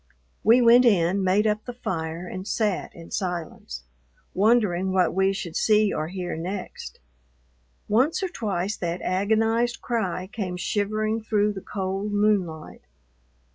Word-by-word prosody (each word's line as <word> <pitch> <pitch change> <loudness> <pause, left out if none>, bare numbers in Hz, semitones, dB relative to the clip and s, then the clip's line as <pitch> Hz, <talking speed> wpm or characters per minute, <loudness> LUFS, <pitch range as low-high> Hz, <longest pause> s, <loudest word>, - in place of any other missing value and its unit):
We 235 +3 +6
went 240 +2 +7
in, 195 -4 +3
made 190 +3 +3
up 215 0 0
the 245 - -6
fire, 165 -6 -4
and 185 +2 -7
sat 210 -5 -1
in 165 -1 -12
silence, 170 - -4 0.5
wondering 195 -3 +2
what 185 -2 +2
we 190 +1 +2
should 175 -4 -5
see 215 -1 +3
or 155 - -2
hear 180 0 -4
next. 180 +4 -6 0.9
Once 260 - +2
or 380 - -1
twice 205 - -2
that 175 0 -3
agonized 225 +5 +1
cry 190 -6 -2
came 185 -2 -5
shivering 215 +4 -1
through 210 -1 +1
the 190 - -7
cold 195 +2 -3
moonlight. 200 -7 0
200 Hz, 135 wpm, -25 LUFS, 180-215 Hz, 0.9 s, went